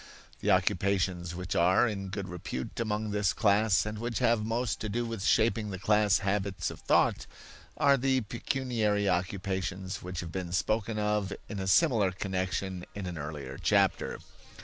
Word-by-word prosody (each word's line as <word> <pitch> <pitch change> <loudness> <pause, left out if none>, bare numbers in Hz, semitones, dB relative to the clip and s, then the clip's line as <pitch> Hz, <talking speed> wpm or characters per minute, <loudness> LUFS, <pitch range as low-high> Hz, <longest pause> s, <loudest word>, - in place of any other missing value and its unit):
The 105 - -1
occupations 95 -2 +1
which 90 +1 -4
are 90 +7 +4
in 100 -3 -4
good 100 -1 -4
repute 90 +6 -6
among 110 -1 -1
this 100 -4 +1
class 105 -1 +3
and 105 0 -4
which 120 -1 -3
have 115 -3 +2
most 115 +2 -1
to 110 - -3
do 120 +3 -1
with 115 -4 -4
shaping 110 0 +2
the 95 - -4
class 105 0 +3
habits 100 -1 -1
of - - -10
thought, - - +2 0.5
are 140 -1 +5
the 130 0 +2
pecuniary 110 -3 -1
occupations 95 +1 -2
which 90 0 -5
have 85 -2 -7
been 90 -2 -4
spoken 110 +3 0
of 105 -2 0 0.2
in 105 - -5
a 95 - -3
similar 110 - +4
connection 95 -1 -3
in 100 -2 -5
an 90 -3 -5
earlier 70 -3 -6
chapter. - - +2
100 Hz, 165 wpm, -30 LUFS, 95-110 Hz, 0.5 s, are